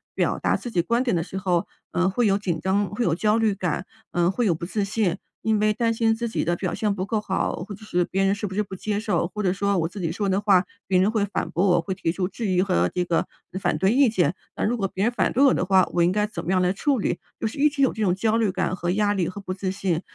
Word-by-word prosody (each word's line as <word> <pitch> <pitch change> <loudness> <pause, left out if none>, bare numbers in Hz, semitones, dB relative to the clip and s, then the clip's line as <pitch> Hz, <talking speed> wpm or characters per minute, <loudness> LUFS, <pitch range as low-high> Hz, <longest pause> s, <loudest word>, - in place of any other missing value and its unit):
表 - - 0
达 - - +1
自 240 - -7
己 175 - +2
观 235 +7 +1
点 240 -8 +1
的 165 - +1
时 190 - -7
候， 180 -3 0 0.2
嗯， 180 +1 +2
会 235 +5 +1
有 195 0 +3
紧 175 -5 -2
张 190 +4 +1
会 230 +4 -2
有 165 - +2
焦 215 +3 +2
虑 220 -3 +2
感， 180 -1 -2 0.3
嗯， 175 0 +2
会 240 +4 0
有 175 - +3
不 170 - -6
自 205 +3 -1
信。 200 -3 0 0.3
因 220 -1 +3
为 215 0 +3
担 230 +1 +1
心 225 0 +2
自 235 +1 -3
己 220 - -1
的 175 +1 0
表 180 0 -3
现 210 -2 0
不 185 - -2
够 215 0 -1
好， 190 - -1
或 205 - -6
者 215 +2 -14
是 180 -3 +1
别 195 +2 -1
人 195 - +3
是 205 +1 -3
不 190 - -7
是 210 - +1
不 190 - -8
接 205 +2 -2
受。 195 -6 0
或 210 +2 -5
者 180 -1 +2
说 200 0 0
我 165 -1 +1
自 195 +2 -8
己 165 - -1
说 200 +3 -2
的 190 +1 +1
话， 195 -3 +4 0.2
别 185 -1 +3
人 195 +3 +3
会 220 -3 +1
反 205 - -3
驳 190 +4 +1
我 175 -2 +4
会 190 +3 -3
提 175 -3 -1
出 180 +1 -1
质 215 +3 -4
疑 185 -1 +2
和 85 - +1
这 180 - -1
个 170 -1 0 0.3
反 155 - +1
对 190 +5 +2
意 270 -2 +5
见。 175 -7 +1 0.2
那 - - -3
如 235 - +1
果 195 -5 -1
别 190 - -2
人 235 +3 +1
反 - - +1
对 270 - +3
我 270 - +6
的 - - 0
话， 185 -1 +4
我 175 - +2
应 175 - +4
该 210 +2 +1
怎 175 -5 -6
么 170 - -5
样 185 - +3
来 180 +1 +2
处 275 +7 +1
理？ 195 -5 -1 0.2
就 - - -3
是 225 +6 -3
一 300 - +5
直 285 -1 0
有 265 - +3
这 220 - -5
种 185 -3 +2
焦 220 +3 +1
虑 215 -4 +2
感 185 - -1
和 175 -2 -3
压 205 +2 +2
力 185 -4 0
和 195 - -7
不 190 -2 -5
自 190 0 -3
信。 185 -3 -1
195 Hz, 330 characters per minute, -24 LUFS, 180-215 Hz, 0.3 s, 我